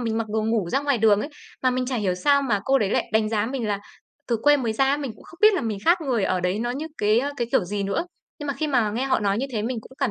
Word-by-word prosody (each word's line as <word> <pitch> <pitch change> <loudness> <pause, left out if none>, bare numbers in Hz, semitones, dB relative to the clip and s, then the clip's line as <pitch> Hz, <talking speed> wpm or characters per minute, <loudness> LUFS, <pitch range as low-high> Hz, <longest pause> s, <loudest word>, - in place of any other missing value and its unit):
mình 225 -2 -1
mặc 225 - -2
đồ 215 +1 -1
ngủ 220 -4 0
ra 270 - +1
ngoài 285 -3 +1
đường 210 -2 +4
ấy. 285 - -4 0.3
Mà 255 - +3
mình 255 0 -1
chả 255 0 -2
hiểu 195 -5 0
sao 280 +10 +3
mà 220 -7 0
cô 270 0 +3
đấy 205 -5 0
lại - - 0
đánh 220 0 +2
giá 215 -1 0
mình 250 -2 -3
là 200 -1 -1 0.5
từ 235 - +2
quê 290 0 +6
mới 240 -5 -1
ra 245 +5 +2
á, 275 +1 +2
mình 280 -5 -4
cũng - - -18
không 340 - -15
biết 430 0 +7
là 370 - 0
mình 220 -5 -3
khác 345 +2 +4
người 250 -9 0
ở 185 -1 0
đấy 180 +3 -1
nó 240 +2 -1
như 280 +6 -4
cái, 210 +2 +3
ơ, 280 +2 -2
cái 240 -3 -1
kiểu - - +3
gì 200 +3 -3
nữa, 200 +11 -1 0.3
nhưng 295 - -6
mà 280 - -2
khi 310 - -2
mà 245 -7 +1
nghe 235 +5 -2
họ 265 -1 +1
nói 200 0 +1
như 265 - -1
thế 215 -3 -1
mình 240 +2 -2
cũng 220 - -16
cảm 270 -4 +1
235 Hz, 335 wpm, -24 LUFS, 210-275 Hz, 0.5 s, biết